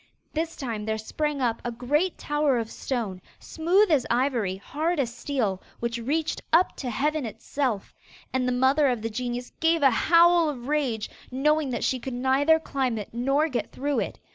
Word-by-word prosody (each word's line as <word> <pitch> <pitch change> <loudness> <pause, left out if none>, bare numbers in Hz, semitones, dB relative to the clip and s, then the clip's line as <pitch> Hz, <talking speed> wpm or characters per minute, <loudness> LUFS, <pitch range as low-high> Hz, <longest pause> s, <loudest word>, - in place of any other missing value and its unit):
This 325 +1 -2
time 230 -7 -4
there 220 0 -1
sprang 295 +6 -2
up 230 -2 0
a 240 - -2
great 295 +10 0
tower 295 -3 +1
of 230 -1 -3
stone, 215 -8 -3 0.2
smooth 355 +5 +2
as 280 -5 +3
ivory, 240 -6 +1
hard 305 - -2
as 240 -4 0
steel, 230 -7 -2 0.2
which 235 0 -2
reached 300 +7 -1
up 340 +3 +4
to 255 - -4
heaven 295 +5 0
itself. 230 0 -3 0.4
And 255 -1 +1
the - - +1
mother 265 +4 +3
of 245 -4 -1
the 225 - -2
genius 245 +2 -4
gave 325 -1 +2
a 270 - +7
howl 335 +5 +5
of 250 -4 -6
rage, 270 -8 0 0.2
knowing 300 +3 +1
that 245 - -2
she 260 - +1
could 255 0 -5
neither 270 +5 +3
climb 265 -6 -1
it 210 - -5
nor 275 +6 +2
get 255 -6 -3
through 285 +1 -1
it. - - -3
265 Hz, 185 wpm, -26 LUFS, 235-300 Hz, 0.4 s, a